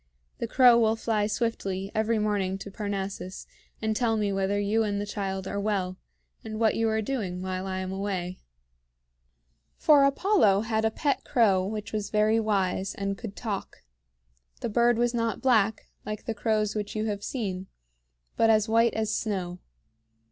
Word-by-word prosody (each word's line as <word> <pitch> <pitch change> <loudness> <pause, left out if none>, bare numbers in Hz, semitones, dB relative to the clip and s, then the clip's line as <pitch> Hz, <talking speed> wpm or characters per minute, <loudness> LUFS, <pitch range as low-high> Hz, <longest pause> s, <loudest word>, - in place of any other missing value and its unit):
"The - - -2
crow 245 -3 +6
will 220 -1 +3
fly 220 -2 0
swiftly 200 -4 -2
every 220 +1 +1
morning 205 -3 0
to 200 +1 -8
Parnassus, 195 -2 -4 0.4
and 220 0 0
tell 225 -1 +1
me 205 -2 0
whether 195 +1 0
you 205 +2 +1
and 205 -2 0
the 205 - -2
child 195 -2 -3
are 200 - -3
well, 195 -3 -1 0.4
and 220 -1 -6
what 225 -2 +3
you 225 0 +1
are 220 0 0
doing 195 -8 -3
while 185 0 -3
I 190 0 -2
am 185 0 -4
away." 190 -2 -3 1.4
For 295 -3 +6
Apollo 275 - +3
had 220 0 0
a - - +4
pet 280 +5 -1
crow 205 -8 +3
which 210 +1 -5
was 210 -1 -2
very 215 +1 +3
wise, 195 -3 0
and 200 0 -2
could 205 -1 -8
talk. 210 -5 -5 0.8
The - - -2
bird 235 +1 +3
was 240 +1 +1
not 230 -1 -1
black, 220 -5 +3 0.2
like 215 0 -6
the 225 - -2
crows 215 -1 0
which 210 -1 -4
you 215 0 -1
have 205 -2 -3
seen, 195 -7 -3 0.7
but 225 - +3
as 215 -1 +4
white 230 +1 +3
as 220 -1 0
snow. 185 -4 -3
210 Hz, 170 wpm, -27 LUFS, 195-225 Hz, 1.4 s, crow